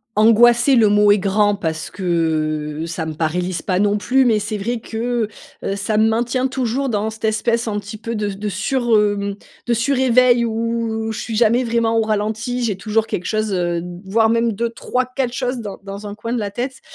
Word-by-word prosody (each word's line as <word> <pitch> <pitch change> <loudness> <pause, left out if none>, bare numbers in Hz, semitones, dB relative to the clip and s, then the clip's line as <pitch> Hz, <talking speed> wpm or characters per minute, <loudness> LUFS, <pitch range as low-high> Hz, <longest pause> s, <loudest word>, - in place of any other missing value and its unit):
Angoisser 235 +5 +5
le 220 -3 +5
mot 205 0 +5
est 205 - +4
grand 205 +2 +2
parce 160 -5 -4
que, 155 -4 -1
ça 165 -1 -4
me 160 - -4
paralyse 175 +3 -2
pas 185 -2 -1
non 205 +1 +2
plus, 265 +5 +2
mais 225 -3 +3
c'est 210 +1 -3
vrai 230 +4 -2
que, 230 0 -2 0.4
heu, 195 - -1
ça 210 +2 -1
me 220 - +4
maintient 240 +3 0
toujours 260 +1 -1
dans 215 -1 -1
cette 220 0 -6
espèce 230 +2 0
un 210 -2 -1
petit 205 +2 -8
peu 230 +2 -5
de 210 -1 -2
s 195 - -6
de 210 0 -2
sur, 240 +1 +1
hem, 200 -1 0 0.3
de 240 - +2
sur 255 +5 +1
éveil 250 -1 +4
où, 225 -1 -2
je 220 - -5
suis 225 - -4
jamais 235 +2 +3
vraiment 230 -1 +1
au - - +3
ralenti, 220 +3 -1
j'ai 220 -4 0
toujours 215 +3 0
quelque 185 -5 -4
chose, 215 -1 -1
heu, 175 -2 0
d 175 0 -8
voire 220 +3 +2
même 230 0 +1
2-3-4 250 +3 -2
choses 250 -1 -2
dans 205 -4 -6
dans 200 +1 -7
un 205 - -7
coin 230 +3 -4
de 245 - 0
la 205 -2 -2
tête 250 +6 -5
220 Hz, 210 wpm, -19 LUFS, 200-235 Hz, 0.4 s, Angoisser